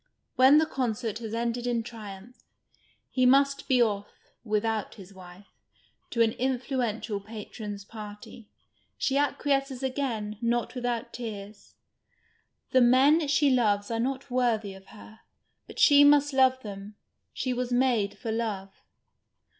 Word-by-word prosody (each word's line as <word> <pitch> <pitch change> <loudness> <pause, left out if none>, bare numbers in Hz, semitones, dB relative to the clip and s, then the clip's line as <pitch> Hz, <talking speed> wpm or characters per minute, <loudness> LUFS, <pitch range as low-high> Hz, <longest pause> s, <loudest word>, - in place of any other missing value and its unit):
When 265 +4 +7
tiie 315 - +1
concert 230 -6 -3
has 225 -1 -5
ended 235 +1 -2
in 235 -2 0
triumph, 220 0 -11 0.7
he 255 - +1
nnist 275 +2 +3
be 255 -3 +4
off 205 -3 -2 0.4
(without 215 -1 -1
his 195 -2 -13
wife) 185 +1 -14 0.6
to 230 - +2
an 225 - +2
influential 245 -4 -2
patron's 210 -1 -8
party. 210 0 -11 0.5
She 270 - 0
acquiesces 275 -2 0
again, 235 -6 -3
not 235 0 0
without 245 -2 -3
tears. 210 -3 -8 1.0
The 260 - +5
men 275 +6 +5
she 290 0 +3
loves 210 -4 +1
arc 230 0 -1
not 265 +1 -3
worthy 230 -5 0
of 190 0 -15
her; 220 +1 -14 0.5
but - - -12
she 285 -1 +7
must 290 0 +5
love 260 -1 +4
them, 205 0 -8 0.4
she 255 - -2
was 250 0 -3
made 245 -5 +1
for 230 -3 -4
love. 210 -4 -3
235 Hz, 135 wpm, -27 LUFS, 210-260 Hz, 1.0 s, When